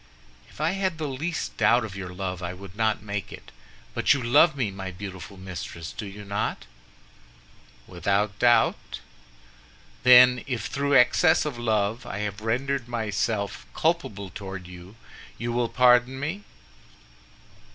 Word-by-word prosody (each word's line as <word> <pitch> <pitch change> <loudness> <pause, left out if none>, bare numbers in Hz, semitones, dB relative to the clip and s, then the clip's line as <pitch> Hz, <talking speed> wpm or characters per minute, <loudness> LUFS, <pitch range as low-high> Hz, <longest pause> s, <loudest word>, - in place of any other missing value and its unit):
"If - - -17
I 155 +2 +1
had 190 -3 -1
the 155 -2 -3
least 155 +5 -4
doubt 115 +2 +4
of 100 -3 -8
your 95 -2 -6
love 90 0 -5
I 90 +1 -4
would 95 0 -12
not 110 -2 0
make 100 -1 -4
it, - - -11 0.4
but - - +3
you 130 - -3
love 140 +5 +5
me, 120 -7 -1
my 95 -1 -6
beautiful 95 +1 -9
mistress, 90 -3 -7
do 105 - -7
you 100 +1 -10
not?" 100 +1 -3 1.2
"Without 100 +3 -1
doubt." 120 -1 +2 1.0
"Then 125 0 +7
if 120 -5 -3
through 140 0 0
excess 145 +7 +5
of 140 -6 -4
love 110 0 0
I - - -5
have 105 +1 -5
rendered 125 +3 -1
myself 110 -3 -2
culpable 110 - -1
toward 95 -2 -7
you, 90 +3 -12 0.4
you 120 0 -3
will 120 -1 0
pardon 125 +1 +4
me?" 170 +9 -4
110 Hz, 145 wpm, -25 LUFS, 100-130 Hz, 1.2 s, Then